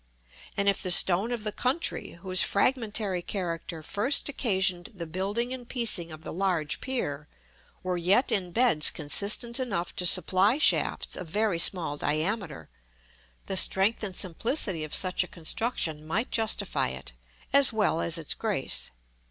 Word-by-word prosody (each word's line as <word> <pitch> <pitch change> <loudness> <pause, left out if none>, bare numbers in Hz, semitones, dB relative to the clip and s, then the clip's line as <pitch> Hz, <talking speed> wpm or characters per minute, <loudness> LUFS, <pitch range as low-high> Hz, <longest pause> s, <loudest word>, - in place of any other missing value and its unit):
And 200 - 0
if 200 - +2
the 185 - -2
stone 185 +5 +5
of 235 -3 -4
the 210 - -2
country, 255 +10 -2
whose 185 -1 +4
fragmentary 210 -4 0
character 170 -3 -5
first 210 - -1
occasioned 190 -9 0
the 170 -3 -6
building 200 +9 -3
and 245 -2 -9
piecing 215 -9 0
of 155 0 -10
the - - -7
large 175 -4 -1
pier, 150 - -3 0.6
were 180 -1 -2
yet 190 +9 +2
in 185 -4 +1
beds 225 -9 +3
consistent 205 - -1
enough 200 -9 -3
to 180 - +1
supply 195 +8 +4
shafts 310 - +2
of 180 - -7
very 205 0 0
small 165 -5 +1
diameter, 155 - -3 0.8
the 195 - -3
strength 195 +3 +3
and 195 -4 -5
simplicity 185 - 0
of 155 - 0
such 185 -1 +1
a - - -10
construction 165 -3 -3
might 200 +10 -2
justify 220 -2 0
it, 65 -1 -7 0.4
as 280 -2 +6
well 210 -7 0
as 170 0 0
its 160 -3 -1
grace. - - -1
190 Hz, 150 wpm, -27 LUFS, 170-225 Hz, 0.8 s, as